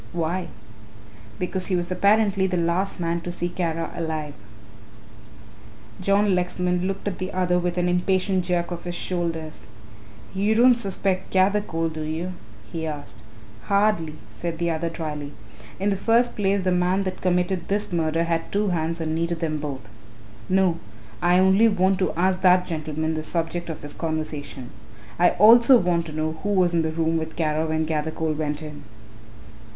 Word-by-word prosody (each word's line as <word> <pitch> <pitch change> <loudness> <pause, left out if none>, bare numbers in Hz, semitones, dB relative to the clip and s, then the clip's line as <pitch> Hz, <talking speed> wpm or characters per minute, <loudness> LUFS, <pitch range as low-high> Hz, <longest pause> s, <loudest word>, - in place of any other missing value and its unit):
"Why?" 175 +1 -2 0.9
"Because 185 0 -2
he 185 - +1
was 175 0 -2
apparently 200 0 +3
the 180 -1 -1
last 175 +4 0
man 170 0 -1
to 175 - -5
see 175 0 -2
Kara 165 -2 -2
alive." 155 -3 -3 1.7
John 200 +1 +3
Lexman 180 0 0
looked 195 +1 -4
at 195 - -3
the 185 +1 -3
other 180 -1 +1
with 175 0 -2
an 175 0 +1
impatient 185 +1 +1
jerk 175 -1 -1
of 175 0 -6
his 175 0 -4
shoulders. 165 -3 -3 0.7
"You 205 +3 +1
don't 245 +2 +7
suspect 195 -4 -1
Gathercole, 190 -4 +1
do 155 - -5
you?" 160 +4 -3 0.4
he 160 -2 -3
asked. 145 -7 -7 0.4
"Hardly," 200 -6 +1
said 170 -1 -5
the 170 0 0
other 165 +1 -1
drily; 150 -3 -5 0.5
"in 200 +2 +1
the - - +1
first 235 +4 +2
place 200 -1 +1
the 185 - +1
man 180 +2 +2
that 185 -1 -4
committed 180 -1 0
this 205 -2 -1
murder 165 0 +1
had 165 -1 -2
two 205 0 +1
hands 165 -1 -1
and 160 -1 -1
needed 165 +1 -1
them 155 -2 -2
both. 140 -6 -6 0.6
No, 185 -3 +2 0.4
I 175 +1 +4
only 190 +4 +5
want 190 -2 +2
to 185 - +1
ask 185 +2 +1
that 180 -1 +5
gentleman 155 -1 -3
the 155 - -2
subject 170 +2 -2
of 160 - -6
his 145 0 -6
conversation. 155 -5 -4 0.5
I 175 0 +6
also 235 +5 +8
want 175 -4 0
to - - -7
know 155 +1 -3
who 205 - -2
was 180 -2 +3
in 170 - +3
the 160 - -1
room 165 0 0
with 160 0 -4
Kara 155 -1 0
when 160 0 0
Gathercole 160 0 -1
went 150 0 -3
in." 150 -1 -8
175 Hz, 170 wpm, -24 LUFS, 160-185 Hz, 1.7 s, also